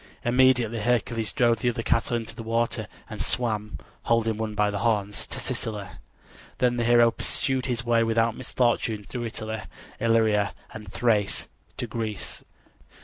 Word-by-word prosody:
Immediately 120 -2 +4
Hercules 115 -1 0
drove 120 -2 +3
the 120 - +2
other 115 -1 -3
cattle 115 +1 +1
into 115 -1 -6
the - - -7
water 115 -1 0 0.2
and 110 -2 -6
swam, 110 -2 -1 0.3
holding 115 -1 +2
one 110 -1 -3
by 105 0 +2
the 100 - -2
horns, 105 -2 0
to - - -4
Sicily. 105 -3 -3 0.7
Then 120 -1 +2
the 120 - +1
hero 120 0 +6
pursued 130 +2 0
his 120 -2 -2
way 115 -1 +3
without 115 0 +2
misfortune 115 -3 0
through 120 +3 -5
Italy, 110 0 -5 0.4
Illyria 110 -3 +2 0.2
and 105 -2 -9
Thrace 105 -4 +1 0.3
to - - -2
Greece. 110 -3 -4
115 Hz, 150 wpm, -26 LUFS, 110-120 Hz, 0.7 s, hero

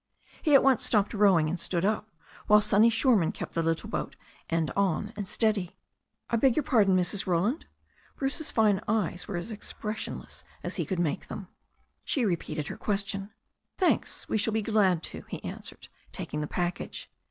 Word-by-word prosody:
He 300 -3 +4
at - - +7
once 265 -3 +4
stopped 210 -1 +2
rowing 195 -7 +4
and 175 +3 -2
stood 175 +1 -1
up, 215 +1 0 0.4
while 210 0 +7
Sonny 210 +2 +5
Shoreman 225 - +3
kept - - -7
the 165 - +1
little 165 0 -1
boat - - -3 0.3
end 165 -2 0
on 200 +2 0
and 205 -2 -4
steady. 210 -4 0 0.5
"I 235 - +1
beg 250 +1 +4
your 305 - +1
pardon, 200 -8 +4
Mrs. 185 +2 0
Roland." 190 - 0 0.5
Bruce's 280 +3 -2
fine 210 -3 +3
eyes 205 -5 0
were 195 - -3
as 175 +7 -5
expressionless 215 +1 -6 0.2
as - - -3
he - - -1
could 190 - -2
make 170 -4 -1
them. 195 -3 -7 0.5
She 260 -5 0
repeated 165 -5 -2
her - - -6
question. 200 -1 -2 0.5
^Thanks, 370 - +1
we 220 - 0
shall 215 +1 +1
be 220 -1 0
glad 195 -6 +2
to," - - -6
he - - -6
answered, - - -8 0.2
taking 150 - -4
the 150 - -2
package. 175 +3 -3
205 Hz, 175 wpm, -28 LUFS, 175-220 Hz, 0.5 s, at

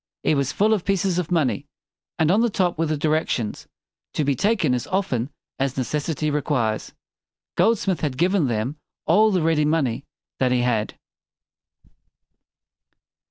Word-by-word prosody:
It - - +3
was 140 -2 0
full 215 +2 +2
of 205 -5 0
pieces 190 -2 +1
of 175 - -3
money. 145 -4 +1 0.5
And 160 -1 +3
on 210 +4 +4
the 240 - +3
top 185 -4 0
were 165 - +1
the 155 0 -1
di 155 - -1
rec 155 +1 +1
tions: 110 -4 -3 0.5
"TO 155 - +1
BE 140 0 +2
TAKEN 185 - +1
AS 125 - -2
OFTEN 150 -11 -1 0.3
AS 135 -1 -1
NE 130 - +1
CES 150 +3 -2
SI 165 - -1
TY 155 - -2
REQUIRES." 130 -7 -1 0.6
Goldsmith 195 -5 +2
had 140 -5 -2
given 180 -2 +2
them 120 +5 -2 0.3
all 210 +7 +5
the 185 -5 +1
ready 160 -2 +2
money 150 -6 0 0.4
that 130 -1 +2
he 125 -1 +2
had. 115 -3 0
155 Hz, 170 wpm, -23 LUFS, 130-180 Hz, 0.6 s, all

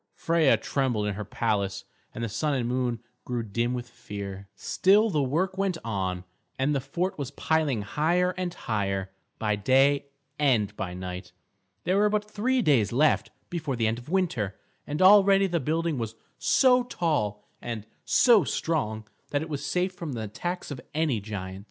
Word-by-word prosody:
Freia 165 -4 +3
trembled 125 -7 0
in 105 - -1
her 105 +2 -5
palace, 100 -2 -1 0.3
and 115 - -6
the - - 0
Sun 145 +7 -1
and 120 -3 -1
Moon 125 -2 -1 0.2
grew 120 -2 -2
dim 115 +3 -1
with 120 -1 -5
fear. 100 -4 -7
Still 205 - +3
the 150 - +1
work 170 +8 0
went 195 -3 0
on, 95 -5 -2 0.3
and 135 +3 +1
the 135 - 0
fort 180 +7 -2
was 140 -3 -3
piling 145 -5 0
higher 170 - +1
and 185 -1 -2
higher, 100 - -2 0.3
by 105 -1 0
day 135 +6 +3 0.3
and 110 -8 +2
by 90 -3 -4
night. 90 0 -7 0.5
There 185 +3 +2
were 210 0 +4
but 210 0 0
three 240 +4 0
days 125 - +3
left 150 +6 +3 0.2
before 155 -6 -2
the 115 -1 0
end 110 +2 0
of 120 +4 -13
winter, 150 - 0 0.3
and 150 +5 0
already 195 0 +7
the 175 -3 0
building 160 0 -1
was 115 -1 -4 0.2
so 255 -2 +5
tall 150 - -1 0.2
and 115 -3 -5 0.2
so 235 -7 +5
strong 110 -9 -2 0.2
that 145 +1 0
it 160 - -8
was 145 -2 -4
safe 180 +6 0
from 170 -5 -6
the 115 - -4
attacks 175 - -4
of 130 - -6
any 155 -7 +1
giant. 95 -2 -6
135 Hz, 175 wpm, -27 LUFS, 105-170 Hz, 0.5 s, already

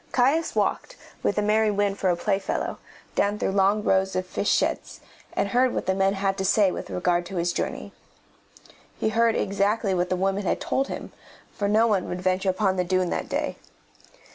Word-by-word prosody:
Caius 275 +6 +2
walked, - - -1 0.3
with - - 0
the 210 - +1
merry 215 +1 +3
wind 205 -1 0
for 190 - +1
a 175 - +3
playfellow, 195 +2 -2 0.3
down 205 +1 +1
through 195 - -1
long 200 +2 +2
rows 190 -1 +1
of 185 - -1
fish 200 - -2
sheds, - - 0 0.3
and 200 - 0
heard 250 +3 +2
what - - -2
the 190 - +1
men 195 +1 +1
had 195 0 -1
to - - 0
say 195 0 +3
with - - -6
regard 175 -1 0
to 190 - -8
his 175 0 0
journey. - - -4 1.0
He - - 0
heard 230 0 +2
exactly 200 +1 0
what 180 0 0
the 185 - +1
women 195 +2 0
had 185 - 0
told 270 +1 -1
him, - - -6 0.4
for 200 - -1
no 215 +3 +4
one 205 -5 0
would 180 - -3
venture 185 +1 +1
upon 190 0 +1
the 180 - +2
dune 185 0 0
that - - -3
day. - - -2
195 Hz, 200 wpm, -25 LUFS, 185-210 Hz, 1.0 s, no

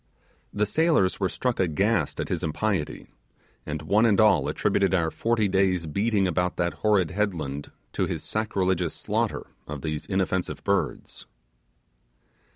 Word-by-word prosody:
The 105 +1 +1
sailors 155 - +2
were 95 -2 +1
struck 125 +5 -2
aghast 95 +5 +1
at - - -3
his - - -1
impiety, 85 0 -2 0.6
and 75 0 -4
one 105 +8 +3
and 100 -3 +3
all 100 -10 +5
attributed 95 -1 +1
our 80 -3 +1
forty 115 -2 +1
days' 95 -3 +1
beating 100 +5 +1
about 90 0 0
that 85 0 0
horrid 100 -6 +3
headland 80 -8 -2 0.2
to - - 0
his - - -4
sacrilegious 95 -6 -1
slaughter - - -2 0.2
of 75 -2 -6
these 75 -1 -3
inoffensive 95 -1 -1
birds. - - -2
95 Hz, 140 wpm, -26 LUFS, 85-105 Hz, 0.6 s, all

